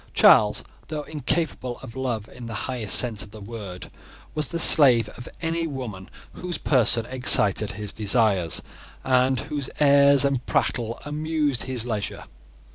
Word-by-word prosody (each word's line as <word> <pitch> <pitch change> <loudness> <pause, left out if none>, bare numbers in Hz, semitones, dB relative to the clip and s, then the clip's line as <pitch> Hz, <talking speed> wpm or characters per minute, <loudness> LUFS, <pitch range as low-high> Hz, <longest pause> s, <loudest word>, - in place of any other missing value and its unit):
Charles, 105 -1 +4 0.2
though 155 -2 -5
incapable 145 -4 -3
of 115 - -11
love 120 -5 -4
in 125 -2 -11
the 115 - -7
highest 120 -6 +1
sense 115 -5 +3
of 100 - -8
the 105 +1 -13
word, 100 -4 -9 0.4
was 155 -2 0
the 170 - -4
slave 125 -9 +7
of 120 - -11
any 165 0 -2
woman 120 -10 -8 0.2
whose 180 -1 -5
person 120 -4 +2
excited 110 -5 +2
his 105 0 -7
desires, 105 - +1 0.4
and 130 0 +1
whose 145 -2 -6
airs 140 -1 +4
and 135 -3 -1
prattle 115 -1 -2
amused 150 -3 -2
his 125 -3 -1
leisure. 110 -4 -5
125 Hz, 145 wpm, -23 LUFS, 110-140 Hz, 0.4 s, slave